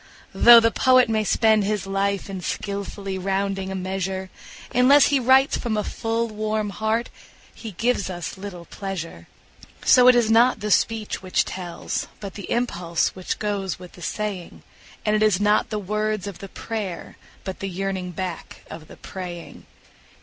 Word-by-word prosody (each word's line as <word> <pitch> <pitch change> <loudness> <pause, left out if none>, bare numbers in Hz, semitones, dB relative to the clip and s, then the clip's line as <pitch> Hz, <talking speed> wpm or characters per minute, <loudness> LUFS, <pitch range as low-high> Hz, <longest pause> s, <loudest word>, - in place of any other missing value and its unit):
Though 235 0 +9
the 230 0 +2
poet 255 -1 +4
may 220 -1 +1
spend 220 0 +3
his 205 -1 -1
life 195 0 -1
in 195 -2 -6
skilfully 200 0 -4
rounding 195 0 -2
a - - -4
measure, 190 0 -3 0.4
Unless 265 +4 +6
he 285 -1 +3
writes 265 +2 +4
from 225 -3 -2
a 210 - 0
full, 230 +2 -2
warm 215 -1 -2
heart 220 +3 -1 0.4
he 220 -3 -9
gives 230 +2 0
us 175 -2 -5
little 190 -3 -8
pleasure. 170 - -7 0.6
So 250 0 +7
it 250 - +8
is 230 -2 +3
not 235 +1 +4
the 210 0 -3
speech 220 -1 +1
which 185 -1 0
tells, 175 -2 -5
but 200 -2 -7
the 200 - -8
impulse 175 -9 0
which 185 -1 -5
goes 200 -3 -2
with 180 -1 -12
the 175 - -15
saying; 200 -1 -5 0.4
And 210 0 +2
it 215 - +1
is 210 -4 +3
not 210 +1 +2
the 215 - -2
words 215 0 -2
of 200 -4 -7
the 195 - -9
prayer, 210 -6 -6 0.3
but 190 -2 -6
the 195 - -4
yearning 190 0 -3
back 180 -1 -6
of 155 -1 -9
the - - -14
praying. 180 -3 -8
200 Hz, 170 wpm, -23 LUFS, 190-220 Hz, 0.6 s, Though